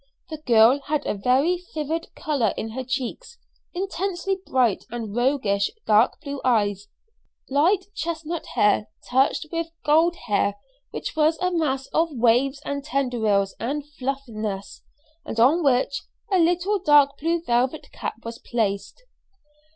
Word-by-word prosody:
The 310 - -5
girl 235 +3 +6
had 300 0 -1
a - - 0
very 270 - +1
vivid 315 +2 -2
color 280 - 0
in 220 - -4
her 260 +3 -4
cheeks, 265 - -4 0.3
intensely 385 +1 -2
bright 245 -6 +2
and 225 -3 -5
roguish 240 -6 +1 0.2
dark 215 +2 +4
blue 280 -2 -6
eyes, 205 -5 +1 0.6
light 350 +8 +3
chestnut 330 -1 -4
hair 210 +1 +3 0.2
touched 265 +5 +2
with 335 -1 -2 0.2
gold 325 +4 +4
hair 205 -2 +1 0.3
which - - -5
was 315 +1 +3
a 365 0 0
mass 280 -6 0
of 330 +1 +2
waves 255 +4 +2
and 280 0 -3
tendrils 235 -9 0
and 285 +5 -3
fluffiness, 240 -8 -5 0.4
and 225 - -5
on 295 +9 +4
which 275 0 +2 0.3
a 380 - +4
little 355 +4 +2
dark 290 -5 +4
blue 330 +2 0
velvet 250 +3 0
cap - - -5
was 230 0 -6
placed. 205 - -2
275 Hz, 135 wpm, -24 LUFS, 230-325 Hz, 0.6 s, girl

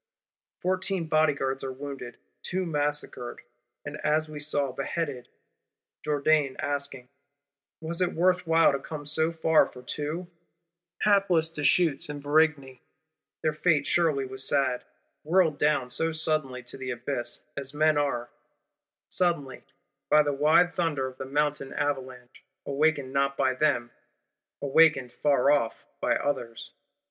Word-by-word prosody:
Fourteen 185 -1 0
Bodyguards 140 -4 +1
are 135 - -3
wounded; 135 -3 -7 0.2
two 185 0 -2
massacred, 145 -6 -3 0.5
and 145 +1 -6
as 155 +1 +1
we 155 -1 -8
saw, 145 -2 0
beheaded; 135 0 -4 0.7
Jourdan 150 -2 +2
asking, 140 -3 -4 0.7
'Was 165 +2 -2
it 180 - +1
worth 180 +1 +2
while 165 0 +5
to 140 - -1
come 150 +1 -7
so 160 +2 +1
far 160 -1 +3
for 125 - -13
two?' 150 +7 -4 0.8
Hapless 190 -6 +3
Deshuttes 150 -1 +2
and 145 -1 -5
Varigny! 145 -3 +1 0.6
Their 155 - +1
fate 155 -2 +2
surely 155 -6 +1
was 130 0 -7
sad. 135 -3 0 0.4
Whirled 160 -2 +2
down 140 -4 +1
so 165 +5 0
suddenly 155 -5 -2
to 120 - -10
the 130 -1 -5
abyss; 120 -1 -4
as 140 0 -5
men 155 +1 +3
are, 120 -4 -2 0.8
suddenly, 165 -8 -1 0.5
by 150 0 +6
the 145 -1 -1
wide 155 +5 +4
thunder 165 -7 0
of 130 0 -8
the 130 - -4
Mountain 145 0 -1
Avalanche, 130 -3 -4 0.2
awakened 140 -2 +1
not 140 0 +1
by 130 -1 +2
them, 125 -4 +1 0.7
awakened 140 -3 +4
far 140 -1 +3
off 115 -6 0 0.2
by - - +2
others! 120 -5 -3
145 Hz, 135 wpm, -27 LUFS, 135-160 Hz, 0.8 s, by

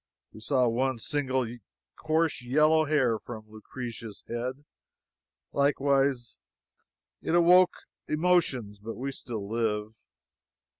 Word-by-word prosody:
We - - -11
saw 125 +2 +2
one 130 +2 0
single 130 +1 -1 0.5
coarse 160 -1 0
yellow 155 +5 +3
hair 130 -7 +2
from 110 -3 -9
Lucrezia's 110 0 -8
head, 125 +4 -4 0.9
likewise. 140 - +1 0.8
It 170 - 0
awoke 180 +1 +6 0.3
emotions, 150 - +1
but 110 +2 -7
we 135 +3 -4
still 115 -6 -6
live. 110 -1 -1
130 Hz, 100 wpm, -28 LUFS, 115-145 Hz, 0.9 s, awoke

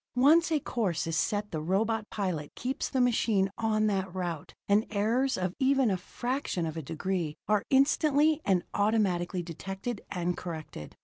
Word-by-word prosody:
Once 315 +7 +5
a 310 - +3
course 210 - -1
is 165 -1 -2
set 205 +6 0
the 155 - -3
robot 215 +6 0
pilot 180 -8 -3
keeps 260 +4 -3
the 265 - -1
machine 220 -5 +2
on 215 -1 +1
that 195 -3 0
route 175 -4 -4
and 205 +2 +3
errors 230 +6 +1
of 185 -1 -1
even 265 -3 +3
a - - +2
fraction 240 -1 -3
of 160 -1 -4
a 160 - -3
degree 165 +1 -3
are 210 -1 +2
instantly 295 +3 +3
and 185 -3 +2
automatically 195 -4 +1
detected 195 +7 -5
and 175 -1 -1
corrected. 160 - -7
205 Hz, 165 wpm, -29 LUFS, 175-245 Hz, -, Once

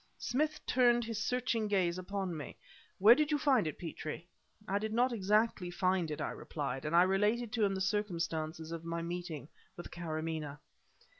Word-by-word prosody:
Smith 300 +4 0
turned 240 -1 +4
his 225 -1 -3
searching 245 -2 0
gaze 185 -3 +1
upon 190 -1 -3
me. 150 -5 -7 0.4
"Where 210 +5 +9
did 305 +3 +1
you 300 - +2
find 265 - +3
it, 155 - -4
Petrie?" 160 -1 -6 0.4
"I 200 +1 +1
did 215 +1 -3
not 245 +2 +3
exactly 210 -2 +1
find 185 -1 +1
it," 150 - -4
I - - -2
replied; 135 -2 -4
and 155 +2 0
I 175 - +8
related 210 +5 +1
to 230 -3 +1
him 195 -1 +2
the 190 - -3
circumstances 165 -5 -2
of 165 -1 -5
my 165 0 -3
meeting 170 -4 -5 0.3
with 175 - -8
Karamaneh. 155 -3 -4
185 Hz, 175 wpm, -33 LUFS, 165-220 Hz, 0.4 s, Where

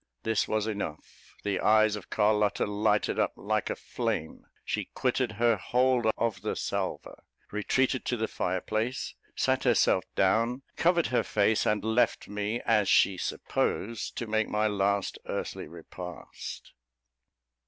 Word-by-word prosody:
This 110 -1 +1
was 110 -1 0
enough: 100 -8 -6
the 100 -2 0
eyes 110 0 +4
of 105 - -9
Carlotta 105 -1 +2
lighted 105 0 +1
up - - +1
like - - -1
a - - -1
flame; 80 - -4 0.2
she - - -2
quitted 125 -2 0
her 115 +1 +3
hold 125 +3 +2
of 115 -3 -1
the - - -2
salver, - - -3 0.3
retreated 130 +5 +1
to 125 - 0
the 110 0 -1
fireplace, 110 +7 -2 0.2
sat - - +1
herself - - +3
down, 115 +7 +2
covered 170 0 +3
her - - +4
face, 105 +1 +2
and 105 -1 +1
left 110 +2 +1
me, 105 +3 -3
as 105 -3 +3
she 95 - +5
supposed, 110 +4 -2
to 120 - -2
make 110 -1 0
my 105 0 +1
last 100 -1 0
earthly - - -4
repast. 90 -1 -9
110 Hz, 140 wpm, -29 LUFS, 105-115 Hz, 0.3 s, she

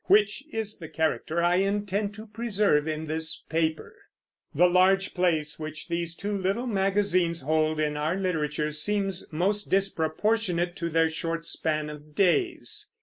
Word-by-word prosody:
which 205 +6 +3
is 220 -2 -4
the 160 -3 -9
character 160 +1 0
I 175 +1 +3
intend 200 +1 0
to 215 +1 -9
preserve 210 -8 +1
in 155 0 -2
this 160 +1 -2
paper. 160 -1 -1 0.6
The 175 +5 +5
large 185 +2 +3
place 160 -5 +1
which 155 +1 -6
these 170 0 -2
two 205 +3 -3
little 195 +5 -1
magazines 195 - +1
hold 155 +2 +1
in 150 -1 0
our 155 +4 0
literature 155 -5 -1
seems 195 +4 -1
most 200 +6 0
disproportionate 180 0 +1
to 170 - -2
their 165 0 +3
short 165 +1 -3
span 155 -2 -1
of 150 0 -12
days. 275 - +1
175 Hz, 145 wpm, -27 LUFS, 155-200 Hz, 0.6 s, The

